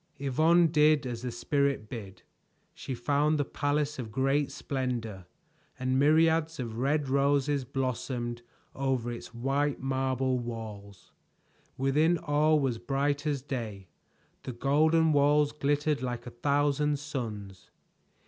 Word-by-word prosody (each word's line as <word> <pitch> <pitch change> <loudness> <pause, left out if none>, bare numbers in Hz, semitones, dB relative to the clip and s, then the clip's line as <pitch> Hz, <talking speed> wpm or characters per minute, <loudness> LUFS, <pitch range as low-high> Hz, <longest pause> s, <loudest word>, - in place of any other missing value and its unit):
Yvonne 155 +6 +3
did 155 -2 +3
as 120 -2 -4
the 125 -1 -4
Spirit 140 -1 0
bid. 105 -5 -9 0.5
She 130 - -6
found 145 +5 +1
the 145 - 0
palace 145 0 -1
of 115 -4 -5
great 135 +4 +1
splendor, 120 -9 -4 0.5
and 130 +1 0
myriads 160 +2 +3
of 115 -2 -4
red 140 +2 +1
roses 140 0 +1
blossomed 125 -2 -3 0.3
over 130 -3 -1
its 120 - -8
white 135 +4 -1
marble 130 -1 0
walls. 110 -4 -8 0.7
Within 150 +6 +2
all 155 -1 +2
was 130 -5 -1
bright 140 +4 -1
as 140 -3 -1
day; 110 - -5 0.5
the 130 - -6
golden 155 +5 +3
walls 145 +1 +3
glittered 145 0 0
like 120 -1 -4
a 125 - -7
thousand 145 +3 +1
suns. 110 -10 -6
135 Hz, 125 wpm, -29 LUFS, 120-145 Hz, 0.7 s, Yvonne